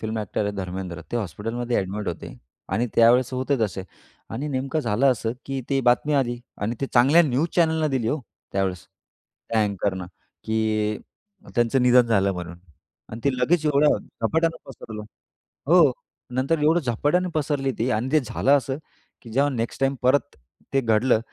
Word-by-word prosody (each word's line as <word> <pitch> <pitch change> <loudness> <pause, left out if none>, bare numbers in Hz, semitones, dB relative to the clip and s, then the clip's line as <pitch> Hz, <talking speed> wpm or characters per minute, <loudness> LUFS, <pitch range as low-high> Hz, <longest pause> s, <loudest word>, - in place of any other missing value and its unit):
Film 110 0 -3
actor 105 0 -2
आहेत 100 0 -2
धर्मेंद्र. 90 -2 -5
ते - - +1
हॉस्पिटलमध्ये 115 +4 -3
ॲडमिट 100 +2 -2
होते 85 - -6 0.4
आणि 120 - +1
त्यावेळेस 120 +2 +5
होते 130 +2 0
तसे 95 -3 -1 0.5
आणि 140 +7 -4
नेमकं 135 +3 -1
झालं 120 +1 +1
असं, 115 -1 -3
की 135 -1 -3
ती 135 -1 +1
बातमी 125 +4 +2
आली 120 -3 +1 0.2
आणि 105 +4 -1
ते 135 - 0
चांगल्या 135 +8 +6
न्यूज 150 +2 +1
चॅनलनं 160 -2 +2
दिली 125 -4 0
हो, 150 +3 -1 0.3
त्यावेळेस. 95 -3 -2 0.6
त्या 110 -1 +3
अँकरनं 95 -2 -2 0.4
की 110 -1 0 0.6
त्यांचं 120 +2 +2
निधन 125 -1 +5
झालं 100 -3 +2
म्हणून 85 -1 -7 0.5
आणि 110 +2 -8
ते 140 - +4
लगेच 155 +6 +2
एवढ्या 150 0 +4
झपाट्यानं 160 +8 -1
पसरल, 110 -4 -8 0.7
हो. 165 -4 +6 0.4
नंतर 140 +5 +1
एवढं 160 +3 +4
झपाट्यानं 150 +7 0
पसरली 145 -3 0
ती 120 +3 +1
आणि 115 +5 -1
ते 155 - +5
झालं 135 0 -1
असं 135 0 -3 0.4
की 120 - -12
जेव्हा 140 +4 +2
नेक्स्ट 115 0 -3
टाईम 135 0 +2
परत 140 +3 +2 0.4
ते 135 - +3
घडलं, 115 +1 +3
120 Hz, 165 wpm, -24 LUFS, 110-140 Hz, 0.7 s, चांगल्या